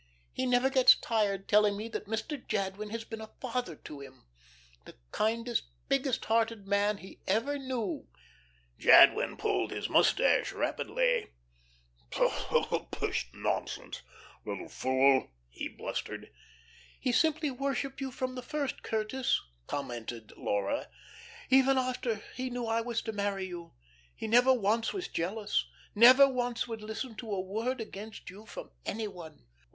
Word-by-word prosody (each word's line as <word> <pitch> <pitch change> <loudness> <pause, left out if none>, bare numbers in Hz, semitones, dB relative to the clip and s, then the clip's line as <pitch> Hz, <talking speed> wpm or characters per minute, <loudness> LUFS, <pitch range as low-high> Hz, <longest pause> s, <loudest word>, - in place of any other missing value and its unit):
He 260 - -1
never 250 +2 +3
gets 260 -1 +7
tired 205 -4 0
telling 210 -1 +4
me 215 +2 -4
that 215 - -5
Mr. 225 +8 -2
Jadwin 205 0 -2
has 225 +1 -4
been 225 0 -7
a 220 - -8
father 245 -9 -3
to 150 0 -10
him 135 - -13 0.6
the - - -12 0.2
kindest, 230 +2 0 0.2
biggest 275 -2 +1
hearted 225 -2 +1
man 200 +1 +2
he 190 - -13
ever 245 +9 +1
knew 255 - -3 0.4
'" - - -35
Jadwin - - +7
pulled - - 0
his - - -4
mustache - - +3
rapidly. - - 0 0.8
"Pshaw, - - +1
pish, - - -2
nonsense - - -3 0.4
little - - -5
fool!" 130 +1 +3 0.2
he - - -4
blustered. - - -6 0.7
"He 255 - 0
simply 310 +3 +2
worshipped 275 +1 -3
you 270 - -2
from 255 0 -3
the 255 - -5
first, 285 +2 -3
Curtis," 225 +4 0 0.3
commented 120 -5 -5
Laura. 100 -1 -1 0.6
"Even 265 0 +5
after 250 -4 -1
he 255 0 -3
knew 245 -1 -3
I 225 0 +1
was 230 -1 -2
to - - -3
marry 200 -2 -2
you. 175 -2 -8 0.4
He - - -6
never 245 +4 +5
once 225 -1 +1
was 380 -2 -3
jealous, 205 +5 -1 0.3
never 255 +5 +9
once 245 -2 -1
would 225 -2 -6
listen 220 +3 -5
to 225 -3 -6
a 195 - -1
word 220 +7 -2
against 215 -2 -8
you 210 +3 -13
from - - -9
any 220 +1 -3
one." 170 - -11
225 Hz, 145 wpm, -31 LUFS, 195-255 Hz, 0.8 s, never